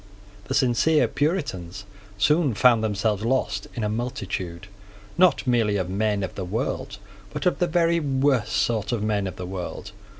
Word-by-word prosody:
The 130 - -3
sincere 135 +4 +3
Puritans 105 - -2 0.3
soon 145 +4 +2
found 115 0 +4
themselves 105 0 0
lost 115 -5 0
in 115 - -3
a - - +1
multitude, 100 -6 -4 0.5
not 180 -3 +4
merely 115 -5 +2
of 95 -1 -2
men 105 0 0
of 95 - -4
the 95 - -5
world, 100 +1 -3 0.3
but - - -5
of 180 - +2
the 175 - +2
very 170 0 +2
worst 135 -5 +1
sort 110 -3 0
of 115 -3 -1
men 105 -2 0
of 95 - -6
the 90 - -6
world. 95 +1 -6
110 Hz, 165 wpm, -24 LUFS, 100-135 Hz, 0.5 s, found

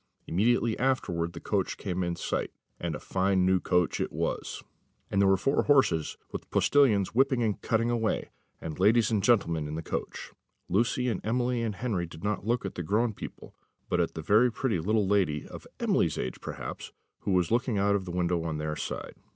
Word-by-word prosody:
Immediately 115 +5 +1
afterwards 90 -10 0
the 85 - -7
coach 100 0 -1
came 95 -2 -2
in 85 -1 -1
sight 85 - -2 0.3
and - - -3
a - - -6
fine 95 0 +1
new 95 0 +3
coach 90 -1 +1
it - - -2
was; - - -3 0.5
and 100 - +2
there 100 - +5
were 95 - +5
four 135 +9 +2
horses, 130 - +3
with - - -6
postillions 115 -10 +3
whipping 130 0 +3
and 105 -3 -1
cutting 115 +1 +1
away; 115 -2 -1 0.3
and 80 0 -6
ladies 110 +3 +4
and 105 -3 +2
gentlemen 85 -9 +2
in 75 - -5
the 80 - -4
coach. - - -5 0.4
Lucy 120 +4 +1
and 115 -6 -1
Emily 120 +2 0
and 110 -3 -2
Henry 95 -7 -2
did 80 +1 -12
not 105 0 -2
look 120 -2 +1
at 95 - -4
the - - -4
grown 110 +7 +1
people, - - -9 0.4
but 90 - +1
at 85 - -2
a 80 - -4
very 110 +8 +4
pretty 115 -6 -1
little 105 +5 +1
lady, 95 -8 +1
of - - -10
Emily's - - +1
age 65 - -4
perhaps, - - -6 0.3
who - - -2
was 90 0 +2
looking 120 -1 +1
out 100 +1 +3
of 100 -2 0
the 90 - -5
window 90 -1 0
on 80 -2 -2
their 75 0 -3
side. - - -5
100 Hz, 200 wpm, -28 LUFS, 85-115 Hz, 0.5 s, there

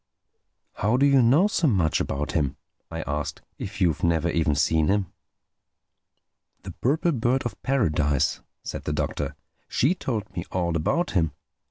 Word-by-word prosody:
"How 110 +5 +2
do 140 - +4
you 140 -2 +5
know 135 +11 +5
so 190 -6 +1
much 90 - +2
about 70 +2 -2
him?" 70 -3 0 0.3
I 80 -1 -4
asked—"if 75 +6 -5
you've 85 -6 +1
never 85 0 +2
even 80 -3 +1
seen 80 +2 +2
him?" 100 -2 0 1.5
"The - - -7
Purple 155 +7 +1
Bird 125 0 +1
of 120 - -5
Paradise," 75 - +1 0.2
said - - -6
the - - -1
Doctor—"she 140 +8 -2
told 110 - -4
me 85 - -2
all 85 -2 0
about 105 - 0
him. 80 -5 +1
95 Hz, 145 wpm, -25 LUFS, 80-130 Hz, 1.5 s, you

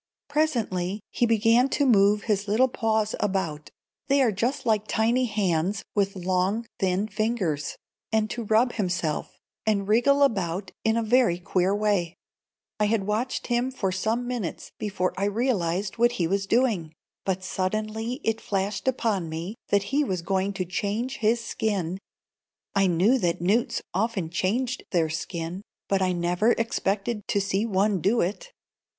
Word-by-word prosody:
Presently 220 - 0
he 240 - +2
began 230 +3 +4
to 285 - +1
move 205 -4 +4
his 205 -2 0
little 225 +6 +4
paws 220 -3 0
about 185 -7 -2 0.4
(they 280 0 +3
are 235 - +3
just 245 +7 -1
like 215 -2 +1
tiny 235 +3 +2
hands, 195 -3 0
with 200 -1 +1
long, 185 +4 0
thin 190 +2 +1
fingers), 200 -9 -1 0.4
and 220 -1 +2
to 240 - -3
rub 225 +4 +3
himself, 180 -6 -2 0.3
and 200 -2 +1
wriggle 280 +6 +4
about 190 -7 0
in 220 +1 +2
a 230 - +1
very 230 -5 +3
queer 180 +2 +1
way. 205 -5 0 0.6
I 210 - +3
had 210 -2 +1
watched 220 +5 -1
him 245 +1 +1
for 210 -8 -2
some 220 +6 -1
minutes 240 -9 -4
before 195 -3 -1
I 195 - 0
realized 205 -3 0
what 240 +1 +4
he 175 - 0
was 195 +3 0
doing, 210 -10 +1 0.3
but 190 -1 -1
suddenly 215 +7 -2
it 225 0 0
flashed 195 +2 -2
upon 215 -9 0
me 165 +5 -4 0.2
that 200 -1 +3
he 295 +2 +4
was 185 -10 -2
going 190 +2 0
to 190 -2 -2
change 205 +7 -2
his 230 +1 +1
skin. 190 -4 -2 0.7
I 195 -1 +3
knew 190 +9 +3
that 170 -5 0
newts 205 +8 +1
often 195 -4 -1
changed 235 +9 -1
their 165 -3 +1
skin, 165 +3 -4 0.3
but 195 -1 +1
I 185 -1 +2
never 180 +6 +2
expected 210 -1 -1
to 200 - +1
see 200 +2 0
one 200 -2 +1
do 220 +8 +2
it. 210 - -2
205 Hz, 155 wpm, -26 LUFS, 185-230 Hz, 0.7 s, began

